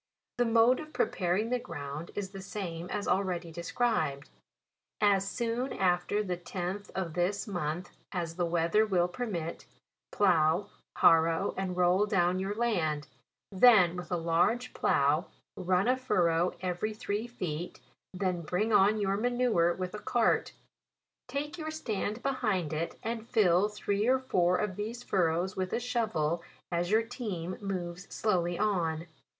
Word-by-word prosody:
The 245 - +4
mode 230 +2 +4
of 310 0 -9
preparing 190 +5 0
the 250 - +1
ground 145 -4 -6
is 195 -2 -4
the 195 -1 -8
same 180 -4 -5
as 205 - -3
already 180 -3 0
described. 165 - -1 0.7
As 195 -2 +3
soon 235 +3 -2
after 185 +2 +1
the 180 -3 -3
tenth 185 +3 -5
of 180 -4 -2
this 180 +6 -1
month 175 -2 -4 0.2
as 170 -3 -3
the 175 0 0
weather 170 +5 +2
will 185 -5 +2
permit, 180 -6 -4 0.4
plough, 175 0 +3 0.3
harrow 165 +3 +4
and 185 -1 -3
roll 180 +3 +3
down 180 -2 +2
your 195 +2 -2
land; 170 -11 0 0.4
then 195 -4 +6
with 180 0 -7
a 175 - +1
large 170 +9 +1
plough 145 +3 +2 0.3
run 185 +2 +1
a 255 - +4
furrow 180 -9 +1
every 185 +4 -2
three 210 +2 -3
feet; 175 -8 -5 0.3
then 180 -2 -1
bring 185 +7 -1
on 205 +2 +5
your 195 -1 +1
manure 240 -7 +2
with 180 0 -4
a 210 - -5
cart; 230 +2 +1 0.7
take 295 +4 -4
your 310 -1 -4
stand 220 -7 -3
behind 215 - 0
it, 160 +2 -3
and 230 0 -4
fill 200 -3 +4
three 210 0 -1
or 260 +1 +5
four 180 -9 +2
of 205 -3 -2
these 225 +4 -4
fur 185 -7 +2
rows 175 +4 -1
with 185 -1 -2
a - - 0
shovel, 215 -10 -1 0.3
as 175 0 0
your 220 +2 +4
team 205 -8 -5
moves 185 -2 -5
slow 210 -5 +1
ly 175 0 -2
on. 170 -6 0
190 Hz, 155 wpm, -30 LUFS, 175-215 Hz, 0.7 s, then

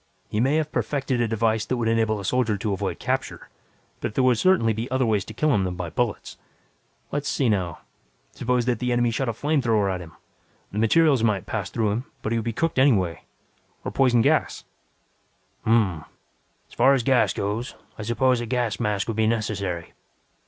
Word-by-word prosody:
He 105 - -1
may 135 +5 +2
have 155 -1 0
perfected 135 -4 -1
a 120 - +1
device 110 0 +1
that 130 - -1
would 115 -2 -1
enable 110 -2 +1
a 100 - -6
soldier 115 -2 +1
to 100 +1 -2
avoid 95 - -3
capture, - - -3 0.5
but 105 - -4
there 130 - +2
would 125 -3 +3
certainly 170 -12 +3
be 115 +4 -4
other 130 0 +1
ways 105 -4 +1
to 110 - -9
kill 155 +3 +2
him 100 -5 +2
than 90 -1 -3
by 90 -2 -5
bullets. 120 +3 -3 0.7
Let's 145 0 -2
see 130 -4 +1
now: 90 -6 -1 0.5
suppose 125 -1 0
that 120 -3 0
the 125 0 -1
enemy 120 -1 +2
shot 125 +2 -1
a - - +1
flamethrower 115 -6 +1
at 90 - -4
him. 80 -2 -11 0.6
The 100 - -6
burning - - +2
materials 140 +2 +4
might 105 -4 +1
pass - - -3
through 110 -3 0
him, 115 +5 -2 0.2
but 110 - -2
he 115 - +1
would 110 - -5
be 115 - 0
cooked 160 +4 -1
anyway. 95 - +2 0.6
Or - - -2
poison 120 -4 +3
gas - - +1 0.5
" - - -40
"Hm 110 - +1
m 115 0 +6 0.2
m. 75 - -14 0.6
As - - -20
far 135 +3 +5
as 125 - -1
gas 130 -3 +3
goes, 110 +4 -3 0.2
I - - -3
suppose 120 +3 +1
a 120 - -4
gas 120 -3 -1
mask 105 -4 -1
would 115 -2 -3
be 110 -1 +3
necessary. 100 -6 -2
115 Hz, 210 wpm, -24 LUFS, 105-130 Hz, 0.7 s, m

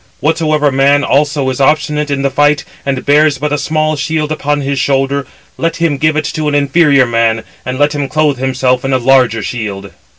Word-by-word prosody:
Whatsoever 155 -1 +1
man 140 +2 +2
also 145 -1 +1
is 130 - -4
obstinate 150 +1 +1
in 140 -1 -2
the 140 - 0
fight, 145 +1 +1 0.2
and 135 -2 -2
bears 150 0 +3
but 145 +2 -2
a - - +1
small 155 0 -1
shield 155 +1 -2
upon 145 -1 -1
his 140 0 -2
shoulder, 135 0 0 0.3
let 165 0 -1
him 170 -5 0
give 155 0 +1
it 155 -1 -1
to 155 -1 -2
an 145 - 0
inferior 140 -1 +3
man, 115 -1 0 0.2
and 130 0 -3
let 145 +1 +1
him 145 -2 -2
clothe 150 -3 0
himself 130 -1 0
in 135 0 -1
a - - +3
larger 125 -3 +2
shield." 100 -4 -5
140 Hz, 200 wpm, -13 LUFS, 130-150 Hz, 0.3 s, bears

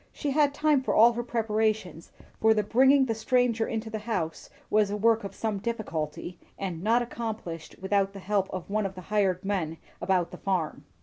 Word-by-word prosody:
She 290 - -3
had 290 0 +3
time 295 -1 +2
for 265 - -1
all 230 +2 +7
her 240 - -2
preparations, 215 -7 -1 0.3
for 220 0 +4
the 210 - +2
bringing 265 +6 +5
the 230 - 0
stranger 230 0 +1
to 220 +1 -5
the 220 - -3
house 190 -7 -3 0.2
was 210 -1 +3
a 205 - -2
work 225 +1 +3
of 200 - -7
some 215 -3 -2
difficulty, 175 -6 -4 0.2
and 180 -4 -4
not 230 +5 +3
accomplished 220 -9 -6
without 195 0 +1
the 200 - -8
help 195 0 0
of 185 -2 -6
one 210 0 0
of 190 - -11
the 185 - -8
hired 190 -2 +1
men 175 -5 -1 0.2
about 185 -3 +1
the - - -8
farm. 180 -5 -2
210 Hz, 195 wpm, -27 LUFS, 190-230 Hz, 0.3 s, all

